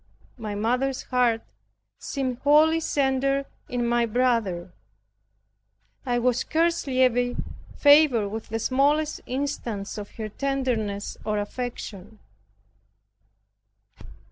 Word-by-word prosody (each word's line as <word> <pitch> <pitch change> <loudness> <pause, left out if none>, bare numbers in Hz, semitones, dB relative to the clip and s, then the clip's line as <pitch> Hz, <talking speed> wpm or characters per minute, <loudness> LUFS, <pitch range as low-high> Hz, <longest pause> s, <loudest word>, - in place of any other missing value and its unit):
My 215 -2 -4
mother's 250 +5 0
heart 245 -3 +2 0.6
seemed 260 -3 -3
wholly 310 +3 +5
centered 275 -2 +1 0.2
in 245 -1 -1
my 235 0 +2
brother. 225 - 0 1.3
I 245 -1 +1
was 245 0 +2
scarcely 315 -6 +1
ever 245 0 +1 0.4
favored 285 -8 +5
with 220 +2 -6
the 225 - -2
smallest 290 +6 +1
instance 240 -6 -3
of 205 - -7
her 220 -1 -4
tenderness 235 -6 -2
or 215 -1 -1
affection. 215 -2 -5
245 Hz, 95 wpm, -25 LUFS, 220-275 Hz, 1.3 s, wholly